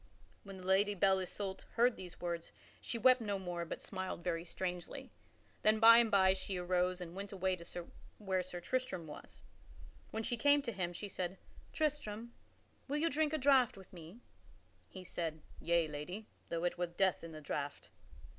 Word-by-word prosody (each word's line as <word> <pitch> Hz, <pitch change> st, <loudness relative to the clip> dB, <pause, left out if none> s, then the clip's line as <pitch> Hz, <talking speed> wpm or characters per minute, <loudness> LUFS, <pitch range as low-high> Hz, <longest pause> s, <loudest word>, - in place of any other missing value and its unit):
When 195 Hz, -1 st, -9 dB
the 185 Hz, -, -10 dB
Lady 200 Hz, +2 st, +3 dB
Belle 190 Hz, 0 st, +4 dB
Isoult 190 Hz, +1 st, -4 dB
heard 240 Hz, +1 st, +4 dB
these 180 Hz, -2 st, -9 dB
words 170 Hz, -1 st, -3 dB, 0.3 s
she 235 Hz, -, -3 dB
wept 255 Hz, +1 st, +6 dB
no 205 Hz, -3 st, -1 dB
more 175 Hz, -2 st, -4 dB
but -, -, -5 dB
smiled 185 Hz, -2 st, -4 dB
very 165 Hz, -1 st, -1 dB
strangely. 180 Hz, 0 st, -5 dB, 0.5 s
Then 215 Hz, 0 st, +4 dB
by 230 Hz, +1 st, +10 dB
and 235 Hz, -1 st, +4 dB
by 190 Hz, -2 st, +5 dB
she 190 Hz, 0 st, -4 dB
arose 180 Hz, 0 st, +1 dB
and 170 Hz, -1 st, -6 dB
went 200 Hz, +1 st, -6 dB
away 190 Hz, -1 st, 0 dB
to 170 Hz, 0 st, -6 dB, 0.3 s
where 190 Hz, -3 st, 0 dB
Sir 180 Hz, 0 st, -6 dB
Tristram 250 Hz, -3 st, -2 dB
was. 150 Hz, -, -11 dB, 0.7 s
When 220 Hz, -, -3 dB
she 240 Hz, +1 st, -1 dB
came 285 Hz, +3 st, +5 dB
to 240 Hz, -, -2 dB
him 185 Hz, -4 st, -2 dB
she 190 Hz, +4 st, -6 dB
said, 185 Hz, -1 st, -3 dB, 0.3 s
"Tristram, 235 Hz, -7 st, -2 dB, 0.5 s
will 285 Hz, +2 st, -1 dB
you 330 Hz, +2 st, +2 dB
drink 305 Hz, +2 st, +2 dB
of -, -, +2 dB
a -, -, -7 dB
draught 265 Hz, -6 st, +5 dB
with 190 Hz, -1 st, -14 dB
me?" 175 Hz, +6 st, -11 dB, 0.7 s
He 185 Hz, -, -9 dB
said, 165 Hz, -3 st, -4 dB, 0.2 s
"Yea, 170 Hz, -1 st, +2 dB
lady, 155 Hz, +8 st, -6 dB, 0.2 s
though 170 Hz, 0 st, -2 dB
it 175 Hz, 0 st, 0 dB
were 175 Hz, -, +1 dB
death 180 Hz, +1 st, +1 dB
in 165 Hz, -, -7 dB
the 155 Hz, -, -8 dB
draught." 145 Hz, -1 st, -4 dB
190 Hz, 185 wpm, -35 LUFS, 175-220 Hz, 0.7 s, by